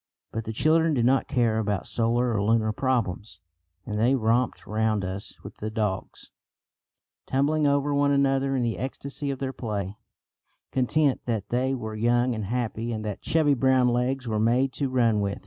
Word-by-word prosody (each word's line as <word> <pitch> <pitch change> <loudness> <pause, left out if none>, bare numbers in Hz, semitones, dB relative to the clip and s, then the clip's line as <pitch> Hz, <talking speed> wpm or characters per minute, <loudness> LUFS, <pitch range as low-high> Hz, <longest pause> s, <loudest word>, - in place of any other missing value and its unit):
But 110 0 -4
the 110 - -3
children 160 +6 +2
did 120 -2 +2
not 130 +2 +3
care 115 -3 +1
about 100 -4 -1
solar 120 +1 0
or 105 - 0
lunar 110 +1 +2
problems, 110 -7 -2 0.5
and 105 -1 -3
they 125 +5 +3
romped 120 +1 0
round 110 -2 0
us 95 +2 -5
with - - -10
the 110 - -4
dogs, 105 -4 -3 1.0
tumbling 145 +3 +2
over 140 0 +1
one 140 0 +3
another 135 -1 +2
in 125 - 0
the 115 -1 -2
ecstasy 140 +3 -4
of 135 - -2
their 135 0 -3
play, 105 -4 -4 0.7
content 135 +2 +1
that 110 -5 -2
they 130 +2 0
were 110 -4 -5
young 120 +3 +2
and 110 -2 -4
happy, 115 +1 -2
and 110 -1 -4
that 105 -2 -4
chubby 155 -3 +2
brown 130 -1 +3
legs 125 +1 -1
were 110 -1 0
made 125 +4 +2
to 140 -2 -2
run 115 -4 +2
with. 100 0 -2
120 Hz, 180 wpm, -26 LUFS, 110-135 Hz, 1.0 s, not